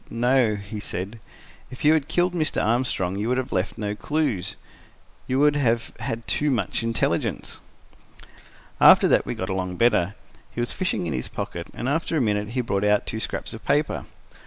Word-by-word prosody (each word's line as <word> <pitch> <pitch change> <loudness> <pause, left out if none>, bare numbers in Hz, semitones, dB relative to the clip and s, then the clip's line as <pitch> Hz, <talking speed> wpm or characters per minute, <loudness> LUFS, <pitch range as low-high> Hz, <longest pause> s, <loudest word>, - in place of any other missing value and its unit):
"No," 120 -1 +2
he 100 +1 -7
said. 100 +2 -5 0.5
"If 130 - -7
you 155 - +7
had 150 -3 +1
killed 180 0 +1
Mr. 155 -3 0
Armstrong, 110 -5 0
you 110 +3 -1
would 125 - +1
have 130 -1 -3
left 95 +2 -1
no 105 -1 -2
clues. 135 - -1 0.7
You 130 - 0
would 145 +1 +4
have 115 -5 +1
had 115 0 -4
too 150 - +1
much 115 -9 0
intelligence." 115 0 -1 1.2
After - - +8
that - - +3
we - - -2
got 95 - -4
along 95 -1 -2
better. 105 -4 +2 0.3
He - - -8
was 120 - 0
fishing 185 - -1
in 80 - -2
his 65 -1 -2
pocket, - - -5
and - - -3
after 160 +3 0
a - - +3
minute 105 -4 0
he - - +3
brought 100 -4 -1
out 105 0 +3
two 110 - -3
scraps - - -3
of 115 - -9
paper. 145 +2 0
115 Hz, 185 wpm, -24 LUFS, 105-135 Hz, 1.2 s, After